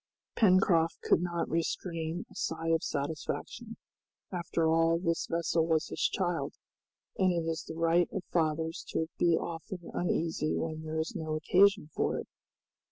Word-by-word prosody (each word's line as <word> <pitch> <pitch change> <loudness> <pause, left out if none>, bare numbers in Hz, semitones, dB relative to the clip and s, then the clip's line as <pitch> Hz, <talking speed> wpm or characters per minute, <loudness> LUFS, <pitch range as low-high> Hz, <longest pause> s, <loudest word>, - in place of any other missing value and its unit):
Pencroft 180 -5 +4
could - - +3
not 170 -1 -1
restrain 165 0 -2
a - - -13
sigh 165 0 -2
of 165 -1 +2
satisfaction. 145 +2 -4 0.5
After 170 -2 0
all 165 +1 +4
this 170 -1 -1
vessel 165 -1 +1
was 160 -1 +1
his - - -5
child, 175 -3 0 0.6
and 185 -1 +4
it 170 -2 -1
is 165 -1 -2
the 160 - -7
right 165 +1 +3
of 195 -3 -3
fathers 160 0 0
to 160 0 -1
be 170 -2 +4
often 170 +1 -6
uneasy 165 -3 0
when 160 -1 -3
there 155 0 -4
is 160 +1 -2
no 155 -1 -2
occasion 185 +1 +3
for - - 0
it. - - -5
165 Hz, 155 wpm, -31 LUFS, 160-175 Hz, 0.6 s, Pencroft